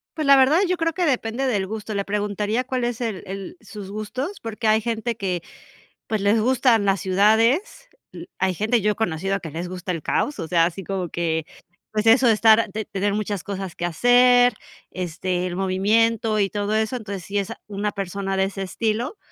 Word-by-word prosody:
Pues, 310 -2 -2
la 275 0 +7
verdad 275 +6 +5
yo 365 0 0
creo 330 0 0
que 360 +1 0
depende 255 -2 0
del 205 -7 0
gusto. 215 +1 -5
Le 200 -1 -1
preguntaría 210 +3 -1
cuál 255 -1 -3
es 240 0 -3
el 220 -6 -3
el 190 -1 -7
sus 205 -2 -9
gustos, 255 - -5
porque 225 0 -3
hay 215 +1 +4
gente 230 +1 -2
que, 185 -5 -2 0.7
pues, 220 -1 -1
les 205 +3 +3
gustan 245 -2 +3
las 195 -1 +2
ciudades. 220 - +2 0.2
L 345 - -10
hay 190 -1 +1
gente, 220 +5 +1
yo 210 +2 +2
he - - -3
conocido 195 -1 -1
que 160 - -8
les 170 +4 -4
gusta 180 0 -5
el 165 -3 -3
caos, 290 - -1
o 165 - -4
sea, 165 -1 +3
así 180 +3 -4
como 185 -2 -3
que, 160 -2 -1 0.5
pues, 215 +1 -1
eso 240 +3 +6
de 230 - +6
estar, 220 +1 +5
de 210 - -5
de 215 - -3
tener 200 +1 -1
muchas 205 -3 -2
cosas 195 -3 -5
que 175 - -3
hacer, 245 +7 +5 0.4
este, 180 0 -3
el 180 -1 -4
movimiento 215 +4 +1
y 200 -1 +2
todo 205 +1 -2
eso. 220 +3 0
Entonces, 200 -6 -6
sí, 200 +4 -4
es, 200 -2 -2
ah, - - -9
una 205 0 -2
persona 195 0 -3
de 190 0 +2
ese 195 0 -4
estilo, 225 - -2
210 Hz, 210 wpm, -23 LUFS, 190-230 Hz, 0.7 s, la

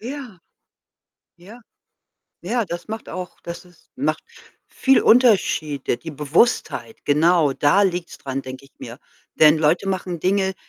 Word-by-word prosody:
Ja. 245 -4 -8 1.0
Ja. 205 +8 -14 0.8
Ja, 230 +5 -1
das 175 +2 -7
macht 220 0 -7
auch 185 0 -7
das 170 +1 -8
ist 175 -2 -24
macht 155 +4 -1 0.5
viel 270 0 +3
Unterschiede. 185 - +2
Die 160 - -9
Bewusstheit, 155 - 0
genau, 155 0 +3
da 145 +9 +3
liegt's 175 -3 -2
daran, 135 0 -5
denke 130 +1 -9
ich 135 - -21
mir. 120 +1 -9 0.4
Denn 155 0 +5
Leute 160 +5 +1
machen 185 -2 -3
Dinge, 190 +1 0
175 Hz, 135 wpm, -21 LUFS, 150-200 Hz, 1.0 s, Denn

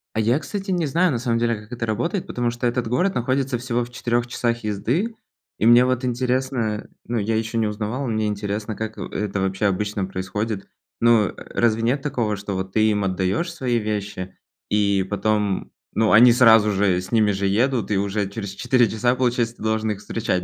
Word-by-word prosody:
А - - 0
я, 115 +6 +2
кстати, 195 +5 -5
не 175 -3 +1
знаю, 170 +4 +2
на 120 - -1
самом 115 -1 0
деле, 115 0 +1
как 105 +2 -12
это 120 -1 -3
работает, 125 - -1
потому 120 -1 -1
что 120 +1 -4
этот 120 -1 0
город 180 +11 +1
находится 130 +1 0
всего 120 0 -1
в 120 - -15
4 120 -1 -1
часах 120 -1 -1
езды. 125 - -1 0.4
И - - +1
мне 120 +2 +7
вот 130 0 0
интересно, 125 -3 -1 0.2
ну, 120 - -2
я 110 +2 0
ещё 115 +1 -2
не 110 -1 +2
узнавал, 110 +6 -3
мне 110 -2 0
интересно, 105 +1 -3
как, 110 +1 -5
э, - - -5
это 100 -1 -2
вообще 95 +1 -1
обычно 100 0 0
происходит. 95 +2 -4 0.3
Ну, 115 -3 +5
э, - - -6 0.2
разве 115 -1 +2
нет 130 +5 +1
такого, 120 -8 -1
что 100 0 -5
вот 95 0 -4
ты 110 0 +3
им 105 -1 0
отдаешь 95 - -1
свои 125 -7 -1
вещи 105 -4 -4 0.3
и 100 -2 +2
потом, 105 -1 0 0.2
ну, 110 0 +2
они 120 +2 +8
сразу 115 -3 +6
же 95 -2 +2
с 90 - -10
ними 110 -3 +3
же 100 0 -2
едут 120 +4 +1
и 100 - +2
уже 100 +1 -1
через 100 -1 -5
4 120 +3 +2
часа, 120 +3 +1
получается, 120 -2 0
ты - - -10
должен 110 0 0
их 100 - -4
встречать 105 -4 -2
110 Hz, 205 wpm, -22 LUFS, 105-120 Hz, 0.4 s, они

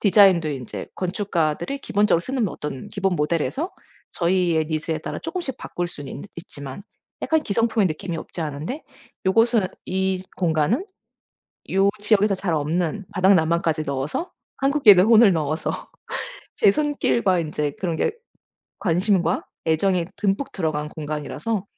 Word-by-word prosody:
디자인도 195 -5 +5
인제 135 -5 -5
건축가들이 185 - -1
기본적으로 205 -4 +2
쓰는 250 +1 -1
어떤 150 -6 -6
기본 195 -2 0
모델에서 170 - -1 0.4
저희의 175 -2 +2
니즈에 155 0 -2
따라 - - -5
조금씩 325 -5 -4
바꿀 175 - -3
수는 145 -5 -9
있는 145 - -8
있지만 145 -1 -8 0.4
약간 320 -1 +2
기성품의 225 -2 +2
느낌이 170 +2 -4
없지 165 - -7
않은데, 155 - -4 0.4
요곳은 225 0 +3 0.2
이 190 0 -1 0.2
공간은 175 - +1 0.9
요 195 +1 +4
지역에서 205 0 +3
잘 185 -3 -1
없는 170 +6 -1
바닥 190 0 +5
난방까지 160 -1 +1
넣어서 140 - -3 0.3
한국인의 270 -10 +6
혼을 225 -2 +7
넣어서 155 0 -1 0.8
제 200 - +5
손길과 235 -9 +1
인제 150 -3 -2
그런 175 -4 -1
게 - - +1 0.7
관심과 180 -1 +1 0.2
애정이 175 +2 +2
듬뿍 205 +6 0
들어간 155 -4 -2
공간이라서 155 +8 -3
185 Hz, 325 characters per minute, -23 LUFS, 160-210 Hz, 0.9 s, 혼을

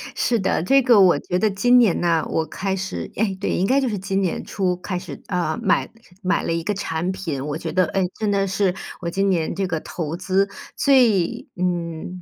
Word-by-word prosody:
是 235 -2 +1
的， 190 -4 0
这 270 +8 +4
个 240 -5 +6
我 185 -2 +5
觉 180 - -2
得 215 +2 +2
今 245 +6 +4
年 220 -8 +3
呢， 170 -2 +1
我 160 - 0
开 190 +5 -3
始 190 +1 -5
诶， 205 -2 0
对， - - -1
应 185 - +1
该 270 +4 +3
就 260 - 0
是 210 -3 -2
今 195 +1 -1
年 185 -3 -2
初 185 -3 -1
开 180 0 -4
始， 170 -7 -9
呃， 170 -4 -1
买 200 +1 +2 0.3
买 185 +1 +1
了 - - -1
一 165 0 -1
个 205 +4 -1
产 175 -2 -2
品。 155 -8 -4
我 150 0 -3
觉 160 -2 -5
得， 185 +1 +3
诶， 190 0 0
真 215 -2 0
的 195 -1 +1
是 190 -1 0 0.3
我 170 - -4
今 195 +2 0
年 165 -3 0
这 195 +1 -1
个 165 -3 -2
投 165 -1 -5
资 190 +2 +1 0.3
最 240 - +3
嗯， 175 0 -3
185 Hz, 235 characters per minute, -22 LUFS, 170-200 Hz, 0.3 s, 个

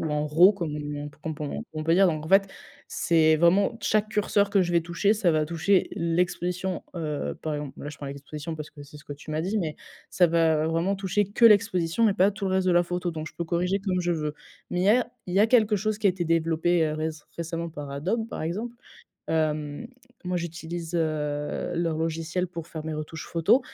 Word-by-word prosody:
ou - - -2
en 150 0 0
raw 170 +7 +6
comme 170 -7 -4
on 145 0 -5
p 145 - -18
qu'on 160 - -3
p 150 - -8
on - - -3
comme - - -4
on 155 0 -4
peut 165 +1 +3
dire, 190 +1 +5
donc 155 -2 -2
en - - -7
fait, 195 +1 +5 0.4
c'est 160 -2 +3
vraiment 170 +5 +4
d - - -12
chaque 215 0 +1
curseur 205 -1 +1
que 200 -1 +4
je 175 -1 0
vais 170 - +4
toucher, 175 +5 +1
ça 195 -5 +2
va 155 -1 +1
toucher 170 +4 +2
l'exposition, 180 +2 -1
heu, 150 - -3
par 155 -1 -3
exemple, 145 -2 -6
là, 145 - -5
je 150 - -11
prends 140 - -7
l'exposition, 145 +3 -6
parce 155 -1 -7
que 145 - -12
c'est 145 +1 -13
ce 145 - -16
que 145 - -7
tu 145 +2 -11
m'as 155 0 -1
dit, 190 +6 -1
mais 160 -7 -2 0.3
ça 180 - +4
va 160 -2 +2
vraiment 165 +5 0
toucher 195 +2 0
que 235 - +2
l'exposition 205 -1 +4
et - - +1
pas 195 +1 +4
tout 205 0 -6
le - - 0
reste 190 0 +1
de 180 - +4
la 175 0 +5
photo, 175 0 -2
donc 155 0 -5
je - - -19
peux 170 - -2
corriger 180 +4 0
comme 190 -2 -1
je 175 0 -1
veux. 150 -2 -2 0.4
Mais 180 - -1
il - - +1
y - - +4
a 245 +3 +3 0.2
il 180 - -3
y - - +4
a 215 - +6
quelque 220 -3 +4
chose 215 +2 -1
qui 215 - +1
a - - +5
été 180 -1 -3
développé, 165 +1 +2
heu, 155 - -1
réc 155 +1 -2 0.2
récemment 170 0 -4
par 145 -2 -7
Adobe 190 +12 -2
par - - -5
exemple, 215 +9 -4 0.5
hem, 155 +3 -1 0.4
moi, 180 0 -1
j'utilise, 170 0 -5
heu, - - +2 0.8
leur 165 -2 0
logiciel 165 +2 -2
pour 165 -2 -7
faire 160 -3 -7
mes 160 0 -3
retouches 155 +1 -6
photos 185 +10 +3
170 Hz, 245 wpm, -26 LUFS, 155-190 Hz, 0.8 s, raw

